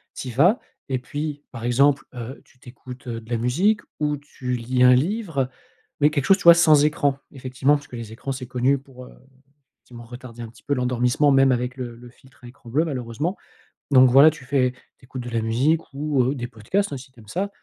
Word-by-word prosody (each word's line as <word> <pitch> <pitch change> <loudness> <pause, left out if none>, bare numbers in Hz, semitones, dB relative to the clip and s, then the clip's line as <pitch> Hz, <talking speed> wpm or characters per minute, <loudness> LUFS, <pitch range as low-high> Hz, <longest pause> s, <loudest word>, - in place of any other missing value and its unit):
Tu 130 - -6
y - - -5
vas 175 - +4 0.3
et 130 -2 -1
puis, 145 +3 -5
par 115 -3 -8
exemple, 135 +4 +3
heu, 125 +2 -8
tu - - -27
tu 125 - -13
écoutes, 125 +1 -12
heu, 115 -1 -4
de 110 - -17
la 120 - 0
musique 175 - +1 0.2
ou 150 -1 0
tu 130 -3 -5
lis 125 +1 0
un 125 0 +7
livre. 160 - 0 0.5
Mais 145 - +6
quelque 145 -3 -1
chose, 195 - +5
tu - - -10
vois 170 - +10
sans 155 -4 +5
écran. 145 -2 +1
Effectivement, 130 +1 0
parce 145 0 -7
que - - -10
les 115 -2 -7
écrans, 130 +4 -6
c'est 130 -1 -7
connu 130 +2 +1
pour, 130 -2 -13
heu, - - -15 0.6
effectivement, 120 -1 -13
retarder 120 0 -10
un 115 - -7
petit 115 - -20
peu 145 - -1
l'endormissement, 125 +2 +1
même 135 -1 +5
avec 125 +1 -2
le 120 -2 -6
le 120 +1 -13
filtre 130 +1 -23
à - - -10
écran 120 -1 -15
bleu, 145 +7 +2
malheureusement. 135 - -3 0.5
Donc 130 -2 +7
voilà, 140 +5 +8
tu 155 -3 -13
fais 130 -1 +1 0.3
tu - - -20
écoutes 130 -1 -7
de 120 - -6
la 115 -1 0
musique 130 +9 +1
ou 140 -2 0
heu, 130 +4 0
des 120 -3 -5
podcasts, 130 - -2
hein, - - -4
si 130 0 -13
tu 125 - -21
aimes 110 - -16
ça. 190 - -3
130 Hz, 235 wpm, -23 LUFS, 125-145 Hz, 0.6 s, vois